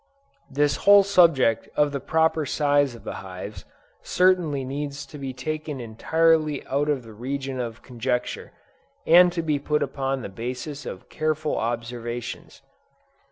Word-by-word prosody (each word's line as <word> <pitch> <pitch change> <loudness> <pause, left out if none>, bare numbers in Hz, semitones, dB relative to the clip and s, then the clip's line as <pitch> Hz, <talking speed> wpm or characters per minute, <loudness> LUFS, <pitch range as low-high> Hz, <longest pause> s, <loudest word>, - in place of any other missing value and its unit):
This 145 +1 +1
whole 200 0 +7
subject 165 - +3
of 150 -1 +3
the 140 - -3
proper 160 +1 +1
size 145 -2 +1
of 115 - -14
hives, 95 +2 -7 0.4
certainly 175 -7 +2
needs 140 +1 -5
to 145 +2 -11
be 135 -1 -4
taken 150 +2 -4
entirely 155 +6 +1
out 145 +2 0
of 140 -4 0
the 115 -1 -12
region 135 +3 -4
of 120 -2 -5
conjecture, 125 0 -3 0.5
and 175 +2 +7
to 170 -1 -3
be 150 -3 0
put 150 +1 0
upon 135 -2 -2
the - - -4
basis 125 +7 -6
of - - -8
careful 155 -1 -1
observations. 120 +1 -5
140 Hz, 140 wpm, -24 LUFS, 125-155 Hz, 0.5 s, whole